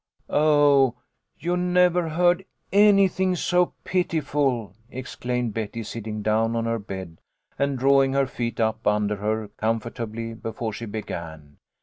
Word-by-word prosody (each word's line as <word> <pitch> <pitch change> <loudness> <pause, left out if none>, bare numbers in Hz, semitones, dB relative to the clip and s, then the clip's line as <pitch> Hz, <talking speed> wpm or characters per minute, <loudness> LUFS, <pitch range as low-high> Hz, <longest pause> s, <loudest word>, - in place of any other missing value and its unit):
"Oh, 145 -4 +4 0.4
you 175 +1 -1
never 180 -1 +2
heard 175 +3 +2 0.3
anything 195 -2 +4
so 180 +1 +1
pitiful," 145 - 0 0.2
ex 130 0 -7
claimed 125 -2 -2
Betty, 115 +1 -4
sitting 110 -1 -5
down 110 +2 +1
on 115 0 -1
her 115 0 -1
bed 95 -5 -8 0.4
and 140 -1 +1
drawing 135 +1 +4
her 140 0 +3
feet 120 -2 -4
up 110 -1 0
under 105 0 +1
her 105 +1 -2
comfortably 115 0 -3
before 115 0 -5
she 115 +2 -6
began. 80 -8 -7
120 Hz, 130 wpm, -24 LUFS, 110-155 Hz, 0.4 s, Oh